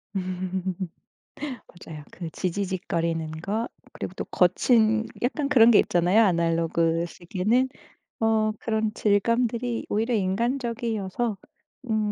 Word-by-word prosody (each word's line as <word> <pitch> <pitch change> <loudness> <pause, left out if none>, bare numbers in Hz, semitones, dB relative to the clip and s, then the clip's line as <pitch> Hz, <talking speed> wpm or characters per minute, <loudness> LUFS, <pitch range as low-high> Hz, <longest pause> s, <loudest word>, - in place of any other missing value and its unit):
음. 185 0 -2 0.7
맞아요. 175 - -9
그 170 -2 -6
지지직거리는 170 -4 -2
것 215 +6 -2 0.3
그리고 - - -6
또 - - -4
거친 220 -2 +3 0.2
약간 275 +4 0
그런 235 -5 +7
게 215 - +7
있잖아요 180 +6 +4
아날로그 165 -2 +1
시계는? 200 +9 0 0.5
어. 220 -1 +2
그런 220 -1 -1
질감들이 230 +3 +1
오히려 225 +4 0
인간적이어서 230 0 -1 0.5
음 215 -1 +1
210 Hz, 255 characters per minute, -25 LUFS, 180-230 Hz, 0.7 s, 그런